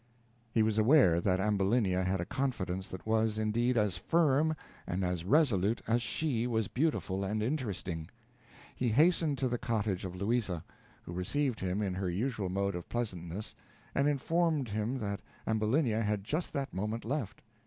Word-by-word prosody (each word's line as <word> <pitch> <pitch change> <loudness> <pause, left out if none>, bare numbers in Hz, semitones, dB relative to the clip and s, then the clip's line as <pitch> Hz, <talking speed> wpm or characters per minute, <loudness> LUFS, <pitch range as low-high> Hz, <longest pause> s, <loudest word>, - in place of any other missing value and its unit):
He 110 0 +3
was 110 0 +1
aware 110 - +5
that 95 0 +2
Ambulinia 100 -1 +2
had 95 +1 0
a 85 - -2
confidence 95 -9 -2
that 95 - -8
was, 110 0 +1
indeed, 120 +3 +1
as 105 -5 +1
firm 160 - +3 0.3
and 90 +2 -1
as 90 -2 -1
resolute 115 - +3
as 120 +2 +2
she 125 -2 -1
was 110 -4 0
beautiful 120 -9 0
and 105 +2 -1
interesting. 100 - -3 0.7
He 125 - 0
hastened 155 +3 +4
to 130 - +1
the 120 -1 -1
cottage 110 -6 -1
of 90 -1 -5
Louisa, 100 -4 0 0.4
who 85 - -8
received 125 +8 -1
him 95 +3 -1
in 95 -2 -1
her 95 0 -2
usual 105 +1 -1
mode 100 +1 0
of 90 -1 -6
pleasantness, 100 -4 -4 0.4
and 140 - +2
informed 150 -1 +1
him 110 +5 -1
that 100 -4 -3 0.3
Ambulinia 110 +2 +1
had 105 -2 0
just 155 - -2
that 140 -3 -3
moment 105 +4 -3
left. 120 -5 -3
110 Hz, 165 wpm, -32 LUFS, 95-130 Hz, 0.7 s, aware